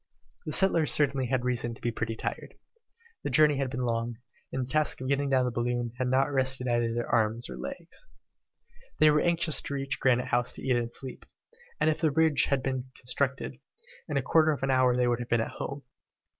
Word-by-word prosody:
The - - -2
settlers 170 -6 +4
certainly 140 -3 +2
had 125 0 -1
reason 120 -2 -1
to - - -19
be 120 - -1
pretty 115 0 -3
tired. - - -5 0.7
The - - -3
journey 150 -2 +4
had 135 -1 -1
been 125 -1 -3
long, 115 0 -2 0.3
and 130 -1 -2
the - - -14
task 155 -1 +2
of 130 - -5
getting 140 +1 0
down 130 -2 +3
the 125 - -1
balloon 120 0 -2
had 130 - 0
not 135 +3 +2
rested 130 -1 +1
either 120 -1 +1
their 120 +1 -2
arms 115 +1 0
or - - -6
legs. 180 - -8 0.9
They 155 -1 +6
were 150 0 +3
anxious 170 -2 +2
to 140 - -5
reach 135 -1 -3
Granite 125 0 +2
House 120 +1 0
to - - -9
eat 130 -2 +2
and 120 -1 -1
sleep, 130 0 -10 0.5
and - - +2
if 155 0 +1
the 160 - +3
bridge 150 -1 +3
had 135 -2 0
been 130 -1 -3
constructed, 130 +1 -2 0.5
in 145 - -1
a 135 - 0
quarter 155 +3 +4
of 150 -3 -1
an 135 - +1
hour 130 -1 +3
they 125 0 +2
would 120 -1 +1
have 120 - -6
been 120 - +2
at 115 - -1
home. 140 +1 -6
130 Hz, 220 wpm, -28 LUFS, 120-140 Hz, 0.9 s, They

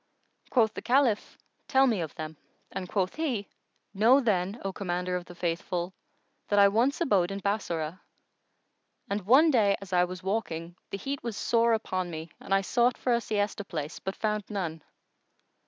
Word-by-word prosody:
Quoth 225 -4 +3
the - - -6
Caliph, 250 -3 +2 0.3
"Tell 265 0 +5
me 225 -8 +1
of 160 - -5
them," 155 0 -6 0.4
and 185 -2 -5
quoth 190 -2 0
he, 250 - -1 0.5
"Know 225 +7 +6
then, 205 -3 0
O 195 - -2
Commander 180 -2 -2
of 180 -1 -3
the 175 - -12
Faithful, 175 +1 -2 0.5
that 205 - +1
I 200 0 +7
once 245 - +1
abode 195 - +3
in 195 0 -4
Bassorah, 185 -5 -2 1.1
and 205 +1 0
one 295 +7 +7
day, 205 -6 +3
as 195 -2 -9
I 180 0 +5
was 180 +1 -8
walking, 175 -4 -2
the - - -4
heat 275 +7 -4
was 230 -3 -4
sore 230 0 +3
upon 185 -5 -1
me 160 -1 -7
and - - -12
I 195 0 +4
sought 240 +5 +2
for 250 - +1
a 235 - +2
siesta 205 -1 -1
place 155 -5 -5
but 190 - -4
found 210 -2 -1
none. 170 -6 -3
200 Hz, 175 wpm, -28 LUFS, 180-230 Hz, 1.1 s, I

